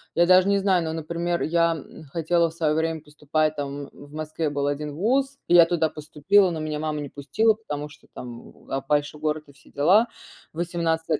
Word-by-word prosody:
я 170 - +5
даже 185 +1 +6
не 200 0 +3
знаю, 190 -3 +2
но, 160 - -3
например, 170 +2 -2
я, 170 +1 +2
м, 160 +1 -11
хотела 165 +3 +1
в - - -13
свое 160 -2 0
время 160 0 -1
поступать 155 +1 -1
там 140 0 -5
в 145 +1 -15
Москве 155 0 -3
был 140 0 -1
один 145 0 -3
ВУЗ, 265 - +1
и 175 - +4
я 170 - +9
туда 165 -2 +1
поступила, 160 +7 +2
но 165 - -4
меня 155 -1 -3
мама 155 -1 -2
не 145 - -6
пустила, 220 +12 +1
потому 150 -9 -6
что - - -18
там 120 -1 -9
в - - -19
а, 135 - -1
большой 145 0 0
город, 155 0 -1
и - - -15
все 140 - -21
дела. 190 +11 +4 0.5
В - - -15
18 165 -2 -1
160 Hz, 215 wpm, -24 LUFS, 150-175 Hz, 0.5 s, я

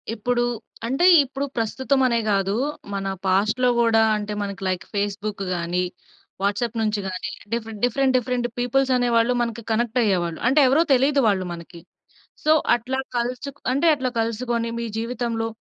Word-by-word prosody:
ఇప్పుడు 240 +2 0 0.4
అంటే 270 +8 +1 0.2
ఇప్పుడు 275 +1 -4
ప్రస్తుతం 260 +4 0
అనే 235 -1 +1
కాదు. 195 0 +1 0.4
మన 195 0 -3 0.2
పాస్ట్‌లో 215 +7 +2
కూడా 225 -1 +4 0.2
అంటే 210 0 -4
మనకి 200 -1 -5
లైక్ 185 -2 -2
ఫేస్‌బుక్ 205 0 -2
గాని, 175 +1 -1 0.6
వాట్సాప్ 205 +4 -1
నుంచి 215 -1 0
గాని 190 +1 -4 0.2
డిఫరెంట్, 225 -3 -4
డిఫరెంట్ 260 +2 +1
డిఫరెంట్ 250 0 -1
పీపుల్స్ 260 +2 +1
అనే 245 0 +1
వాళ్ళు 230 +2 +3
మనకి 235 -1 -3
కనెక్ట్ 235 +2 +1
అయ్యేవాళ్ళు. 175 -5 0
అంటే 275 +4 +4
ఎవరో 285 +6 +4
తెలియదు 275 +2 +3
వాళ్ళు 190 -3 +1
మనకి. 170 0 -11 0.6
సో 310 - +3 0.2
అట్లా 255 +3 -3 0.2
కలుసు 250 +3 -2 0.2
అంటే 280 +6 +2
అట్లా 260 -2 -2
కలుసుకొని 230 +1 -1
మీ 235 - -3
జీవితంలో 230 -1 -2
230 Hz, 150 wpm, -23 LUFS, 205-250 Hz, 0.6 s, కూడా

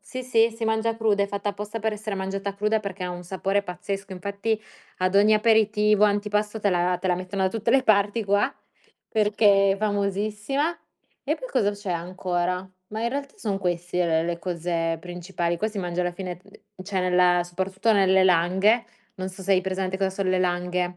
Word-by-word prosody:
Sì, 255 -1 -7
sì, 230 -2 +3 0.2
mangia 220 +1 0
cruda, 210 -3 +2
è - - 0
fatta 200 +1 -2
apposta 210 +2 -6
per 220 0 -1
essere 210 -1 -4
mangiata 195 +1 -3
cruda, 210 +2 +1
perché 195 -2 -5
ha 180 - -3
un 175 0 -7
sapore 195 +2 -1
pazzesco. 195 +2 -5
Infatti 200 +4 -2 0.4
ad 185 +1 0
ogni 210 +2 +6
aperitivo, 210 -1 +4
antipasto 210 +1 0
te 200 -1 +2
la 180 0 +1
te 185 - -2
la 180 - +3
mettono 185 +2 -3
da 190 - +3
tutte 225 +2 -1
le 265 +1 +5
parti 210 0 +2
qua 205 +7 +2 0.6
perché 205 -2 +4
è - - -2
famosissima. 210 - -1 0.5
E - - 0
poi - - -8
cosa 205 - +2
c'è 205 -1 -6
ancora? 180 +1 -2 0.2
Ma 220 +1 -4
in 235 - 0
realtà 280 +1 -4
son 200 -3 -2
queste 175 -2 0
le 170 0 -2
cose 170 -2 -2
principali, 175 -1 -3
qua 215 - 0
si 215 - -6
mangia 175 -1 -2
alla 175 0 -1
fine 180 -1 -6
uhm, 200 -1 -16
cioè 190 -1 -1
nella 180 -1 +3
soprattutto 190 +5 0
nelle 190 -2 +4
langhe 190 +6 +3 0.3
non 185 0 -4
so 190 +1 -10
se 195 +1 +2
hai 185 - +4
presente 190 0 -2
cosa 195 -1 +1
son 190 0 -2
le 185 - +2
langhe. 180 0 -1
195 Hz, 190 wpm, -25 LUFS, 180-210 Hz, 0.6 s, ogni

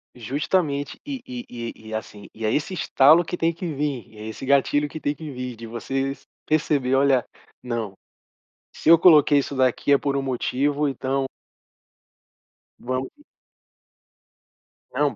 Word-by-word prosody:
Justamente. 145 - -1
E 270 -3 -5
e 250 -1 -7
e 115 -1 -6 0.2
e - - -8
é - - 0
assim 105 -1 -8
e 110 - -7
é 110 - +2
esse 150 +8 -1
estalo 155 0 +5
que 170 - -4
tem 165 -1 +1
que 170 +2 -6
vir. 140 -4 -2
E 110 - -16
é 110 - -7
esse 110 +4 -7
gatilho 140 +2 +2
que 155 +3 -8
tem 145 - -1
que 155 +1 -8
vir 125 -2 -6
de 115 - -9
você 135 +4 -3 0.2
perceber 145 -4 +1
"Olha, 135 -2 +3 0.4
não! 115 -5 -3 0.8
Se - - -3
eu 165 0 +9
coloquei 150 -4 +6
isso 140 0 -2
daqui 130 +2 +2
é 140 - +6
por 140 0 -1
um 140 - 0
motivo, 140 +3 0
então". 135 0 -1 1.6
vamo 130 +1 -3 1.9
Não. - - +1
140 Hz, 160 wpm, -23 LUFS, 125-150 Hz, 1.9 s, eu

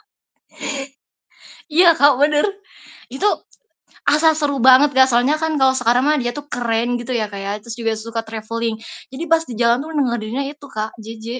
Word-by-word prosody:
ta 430 - -34 1.6
Iya 340 +2 +5
Kak, 285 +1 +6
bener. 295 +4 +3 0.6
Itu 265 +9 -6 0.8
asa 310 +2 +4
seru 290 -2 -1
banget 265 +3 +6
Kak, 260 0 +5
soalnya 245 +4 +2
kan 320 -1 -1
kalo 265 -1 +4
sekarang 245 0 +2
mah 305 - +3
dia 240 - -2
tuh 290 - -7
keren 235 0 -1
gitu 240 +2 -7
ya 235 -3 0
Kak 200 - -7
ya, 200 - -3
terus 225 +2 -9
juga 225 -1 -1
suka 225 +1 -5
travelling. 225 +1 -4 0.4
Jadi 265 +5 -6
pas 325 0 +4
di 240 - -5
jalan 235 0 +3
tuh 315 - -9
ngedengerinnya 245 -3 -1
itu 290 -1 -15
Kak, 215 -3 -4
JJ, 220 0 -10
245 Hz, 180 wpm, -19 LUFS, 230-290 Hz, 1.6 s, Kak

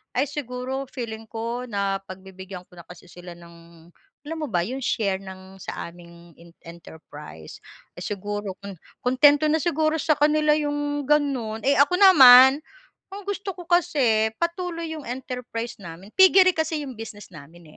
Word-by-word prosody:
Ay 265 +3 +1
siguro 265 -1 -5
feeling 225 -3 -6
ko, 235 +2 -5
napagbibigyan 190 -2 -6
ko - - -19
na - - -11
kasi 180 0 -14
sila 175 0 -12
ng 170 -1 -17 0.4
alam 325 - -4
mo 305 - -3
ba 175 -3 +1
'yong 260 +3 -5
share 200 -5 0
ng 190 0 -12
sa - - -6
aming 170 0 -16
in 170 0 -16 0.2
enterprise, 150 - -12 0.4
siguro 205 0 -5
kung 200 -1 -8 0.3
kuntento 285 +4 +4
na 310 - +2
siguro 315 -2 0
sa 310 - 0
kanila 300 +1 +2
'yong 290 -1 -2
gano'n. 265 -7 0
Eh 280 +1 +3
ako 285 +6 +4
naman, 265 -8 +8 0.5
ang 405 - -7
gusto 400 -1 -4
ko 355 - -10
kasi 265 -11 +2
patuloy 340 -1 -3
'yong 310 -2 -7
enterprise 245 -2 -6
namin. 175 +2 -11
Piggery 375 0 +7
kasi 315 -1 -2
'yong 265 -3 -8
business 210 -2 -10
namin 160 +3 -14
245 Hz, 150 wpm, -23 LUFS, 190-295 Hz, 0.5 s, naman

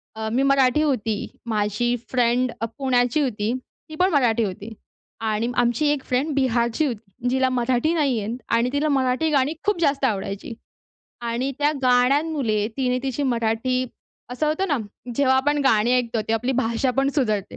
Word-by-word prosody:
अ, 220 0 -4
मी 265 +2 +2
मराठी 275 +1 +3
होती, 225 -8 -1 0.2
माझी 220 +2 0 0.2
फ्रेंड 245 0 +2
अ, - - +1
पुण्याची 255 +1 +1
होती. 220 -4 -1 0.4
ती 310 - -8
पण 365 +3 +3
मराठी 240 -6 +2
होती 205 +3 -5 0.5
आणि 220 +1 0
आमची 245 +5 +2
एक 285 -2 -1
फ्रेंड 275 +4 0
बिहारची 245 +1 +1
होती, 230 -1 -5
जिला 260 0 +2
मराठी 255 +5 +1
नाही 280 -7 +1
येत 220 +4 -3 0.2
आणि 235 +2 +2
तिला 300 +2 +1
मराठी 265 +3 +1
गाणी 280 +2 +2
खूप 415 -4 +1
जास्त 280 -3 +2
आवडायची. 200 0 -3 0.7
आणि 240 +3 -2
त्या 295 +1 +3
गाण्यांमुळे 250 -3 +2
तिने 250 -1 0
तिची 270 +1 -2
मराठी 250 +1 0 0.5
असं 305 +5 -1
होतं 345 +5 0
ना, 290 - +2 0.4
जेव्हा 265 -1 +3
आपण 290 +2 +1
गाणी 230 -1 +3
ऐकतो, 235 -2 -1
ते - - +1
आपली 245 +4 0
भाषा 235 +2 +1
पण 270 0 +2
सुधरते 215 -8 -1
250 Hz, 165 wpm, -23 LUFS, 230-275 Hz, 0.7 s, मराठी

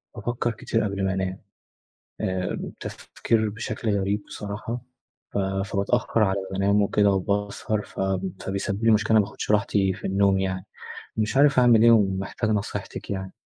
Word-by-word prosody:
بافكر 120 +1 -2
كتير 115 +1 -1
قبل 100 -2 -1
ما 95 - +1
أنام، 95 0 -2 0.8
آآ، 95 -1 -1 0.2
تفكير 110 -2 -1
بشكل 110 -1 -2
غريب 100 +2 -1
بصراحة، 105 +4 -5 0.5
ف - - -1
فباتأخر 100 +3 0
على 100 -1 +2
ما 95 - -7
بانام 100 +1 +3
وكده 100 0 +3
وباسهر، 100 +2 -1
ف - - -9 0.4
فبيسبب 100 +2 -2
لي 115 - +5
مشكلة، 110 +1 +3
ما 105 - +4
باخدش 100 - -6
راحتي 100 -2 +2
في 100 - -6
النوم 100 0 +3
يعني. 95 0 -2 0.5
مش 110 +4 0
عارف 140 -1 +5
أعمل 120 -3 +6
إيه 115 - +7
ومحتاج 100 0 +2
نصيحتك 105 -1 -3
يعني. 95 -1 -4
100 Hz, 150 wpm, -25 LUFS, 95-110 Hz, 0.8 s, إيه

